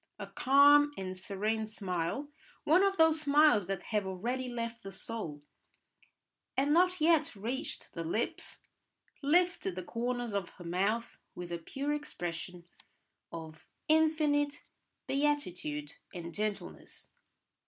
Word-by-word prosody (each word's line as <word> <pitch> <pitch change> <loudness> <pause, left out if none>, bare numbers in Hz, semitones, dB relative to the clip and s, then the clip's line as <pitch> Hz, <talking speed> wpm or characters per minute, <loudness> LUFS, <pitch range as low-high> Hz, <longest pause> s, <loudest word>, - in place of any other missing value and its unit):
A - - -5
calm 285 +2 +6
and 185 -1 -4
serene 215 +4 -2
smile, 195 - -2 0.4
one 325 +5 +5
of 390 0 +2
those 320 -1 +5
smiles 290 - +5
that 195 -2 -3
have 205 -2 +1
already 245 +8 -2
left 230 -1 -4
the 195 - -8
soul 190 -8 -6 1.1
and 280 +2 +3
not 365 +2 +4
yet 315 -4 +3
reached 235 +7 -5
the 165 - -4
lips, 170 +8 -3 0.6
lifted 335 - +2
the 185 - -4
corners 240 +2 -2
of 200 -3 -2
her 175 - -10
mouth 195 +7 -1 0.2
with 175 -1 -7
a 170 - -2
pure 275 - -3
expression 175 - -5 0.6
of 160 -1 -9 0.2
infinite 305 -2 +2 0.4
beatitude 180 - -1 0.2
and 170 -1 -6
gentleness. 210 +1 -5
230 Hz, 120 wpm, -32 LUFS, 180-290 Hz, 1.1 s, calm